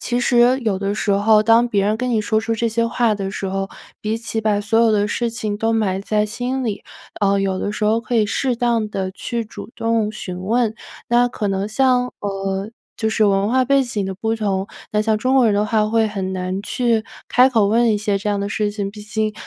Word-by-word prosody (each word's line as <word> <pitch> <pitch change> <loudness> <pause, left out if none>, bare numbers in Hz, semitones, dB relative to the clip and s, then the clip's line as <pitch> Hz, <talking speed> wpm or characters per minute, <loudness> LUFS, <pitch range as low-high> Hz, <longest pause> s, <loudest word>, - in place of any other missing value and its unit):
其 245 0 -1
实 245 +1 +4
有 210 -5 -1
的 200 +1 -1
时 210 -1 -1
候， 210 +2 +4
当 230 +2 +4
别 200 -3 +1
人 215 +1 +1
跟 250 +1 -2
你 220 -2 +2
说 220 +1 +1
出 225 0 -1
这 230 +1 0
些 230 +1 0
话 230 -2 +1
的 195 -1 -4
时 195 - -4
候， 195 0 -2 0.3
比 215 +1 -1
起 225 -1 -3
把 210 -2 +1
所 220 +2 +1
有 230 -1 +4
的 205 -1 +2
事 235 +2 -1
情 215 -3 -3
都 225 +1 0
埋 195 -4 0
在 210 +1 0
心 250 +4 -3
里， 210 -3 -3 0.4
呃， 200 0 +3
有 190 -1 -1
的 205 - -2
时 210 0 -3
候 220 +2 +2
可 235 +1 -4
以 215 - +4
适 250 +3 -1
当 235 -3 0
地 190 -2 -3
去 235 +3 -4
主 220 - -10
动 225 -2 0
询 185 -4 -7
问。 225 +2 +1 0.3
那 240 +1 +4
可 210 -4 -3
能 195 +1 -1
像， 250 +1 +2
呃， 195 0 -3 0.3
就 220 - -1
是 220 -1 +2
文 195 +1 +2
化 255 +1 +3
背 275 0 +4
景 225 -6 -3
的 190 - -4
不 220 +3 -1
同。 200 -3 -1 0.2
那 210 0 +1
像 220 0 +1
中 255 +4 +1
国 255 - +5
人 205 - +2
的 205 +1 +2
话， 215 0 +2
会 225 0 +2
很 190 -2 -4
难 185 +1 -3
去 230 0 0 0.2
开 255 +2 +5
口 220 -5 +3
问 230 +1 +3
一 210 - 0
些 205 -1 0
这 210 - -3
样 200 -1 -1
的 200 - -2
事 210 0 -1
情。 200 -1 -4
毕 210 0 -11
竟， 215 0 -2
215 Hz, 260 characters per minute, -20 LUFS, 205-230 Hz, 0.4 s, 国